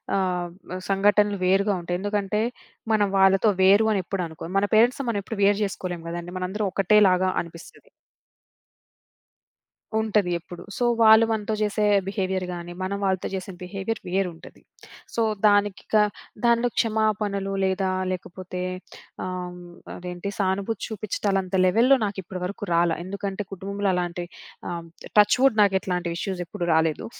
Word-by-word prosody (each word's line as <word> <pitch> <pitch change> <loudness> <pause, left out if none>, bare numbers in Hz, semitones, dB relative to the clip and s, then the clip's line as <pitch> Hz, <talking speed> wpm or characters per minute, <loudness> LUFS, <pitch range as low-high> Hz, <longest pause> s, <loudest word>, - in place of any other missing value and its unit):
ఆహ్, 180 -2 0 0.4
సంఘటనలు 205 +1 +3
వేరుగా 195 +2 +3
ఉంటాయి. 175 +1 -2
ఎందుకంటే, 205 +1 -1 0.5
మనం 210 -2 +3
వాళ్ళతో 195 +2 +5
వేరు 200 +3 +6
అని 200 -3 +1
ఎప్పుడు 195 0 -3
అనుకో 165 +1 -9
మన 200 - +3
పేరెంట్స్‌తో 245 +5 +4
మనం 205 -3 0
ఎప్పుడు 225 - -6
వేరు 200 0 +4
జేసుకోలేం 185 -3 -4
గదండీ 175 +1 -6
మనందరం 190 +3 -2
ఒకటే 195 +2 +3
లాగా 185 +1 +2
అనిపిస్తది. 170 - -13 2.1
ఉంటది 210 -4 +1
ఎప్పుడు. 175 +1 -11
సో, 245 - -1 0.2
వాళ్ళు 220 0 +8
మనతో 220 0 -1
జేసే 210 0 +1 0.2
బిహేవియర్ 190 -2 -1
గాని, 175 0 -7
మనం 200 +1 -2
వాళ్ళతో 190 -1 0
జేసే 190 0 -4
బిహేవియర్ 195 +4 -4
వేరుంటది. 180 -3 -3 0.5
సో, 230 - +1 0.3
దానికిక 205 0 +1 0.5
దానిలో 235 +1 +3
క్షమాపణలు 210 -3 0
లేదా 190 0 0 0.2
లేకపోతే 180 0 -6 0.6
ఆహ్, 180 -1 -5 0.4
అదేంటి 180 +2 -6
సానుభూతి 195 +2 -1
చూపిచ్చటాలంత 195 -3 -2
లెవెల్‌లో 235 +9 +5
నాకు 200 -1 -4
ఇప్పటి 185 +1 -7
వరకు 200 +2 -6
రాలా. 170 -1 +3
ఎందుకంటే, 200 +1 -4
కుటుంబంలో 200 +1 -2
అలాంటి 175 -1 -2 0.4
ఆహ్, 170 -1 -5 0.3
టచ్ 210 +3 +5
వుడ్ 265 -5 +4
నాకు 200 -1 +4
ఇట్లాంటి 180 -2 -2
ఇష్యూస్ 185 0 -3
ఎప్పుడూ 175 - -5
రాలేదు. 160 -1 +1
195 Hz, 135 wpm, -24 LUFS, 180-210 Hz, 2.1 s, వాళ్ళు